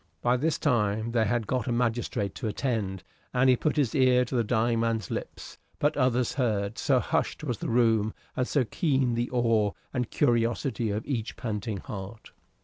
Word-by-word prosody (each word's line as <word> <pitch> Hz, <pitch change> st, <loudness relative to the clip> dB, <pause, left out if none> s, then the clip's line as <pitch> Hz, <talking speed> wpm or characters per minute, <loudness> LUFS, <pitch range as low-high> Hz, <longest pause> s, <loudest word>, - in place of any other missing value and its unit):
By 120 Hz, +1 st, +3 dB
this 155 Hz, +5 st, 0 dB
time 110 Hz, -4 st, +1 dB
they 115 Hz, -2 st, +2 dB
had 115 Hz, +1 st, 0 dB
got 125 Hz, +1 st, -1 dB
a -, -, 0 dB
magistrate 120 Hz, -4 st, -1 dB
to 120 Hz, -, -4 dB
attend, 105 Hz, -4 st, -2 dB, 0.3 s
and 130 Hz, +1 st, +5 dB
he -, -, +5 dB
put 150 Hz, +5 st, -1 dB
his 140 Hz, -6 st, +2 dB
ear 130 Hz, -2 st, +4 dB
to 120 Hz, -, -8 dB
the 120 Hz, -, +3 dB
dying 115 Hz, +1 st, +1 dB
man's 115 Hz, -4 st, -1 dB
lips; -, -, -6 dB, 0.2 s
but 145 Hz, +1 st, +1 dB
others 125 Hz, -3 st, +1 dB
heard, 110 Hz, -5 st, -1 dB
so 135 Hz, -3 st, +3 dB
hushed 160 Hz, +2 st, -1 dB
was 125 Hz, -8 st, -2 dB
the -, -, -3 dB
room 115 Hz, -2 st, +2 dB, 0.2 s
and 125 Hz, -, 0 dB
so 140 Hz, -4 st, +1 dB
keen 135 Hz, -, +1 dB
the 120 Hz, +1 st, -1 dB
awe 115 Hz, -4 st, +2 dB, 0.2 s
and 125 Hz, -3 st, -1 dB
curiosity 115 Hz, 0 st, +1 dB
of 105 Hz, +2 st, -2 dB
each 120 Hz, -5 st, -3 dB
panting 105 Hz, -2 st, -3 dB
heart. 100 Hz, +3 st, -8 dB
120 Hz, 185 wpm, -28 LUFS, 110-125 Hz, 0.3 s, and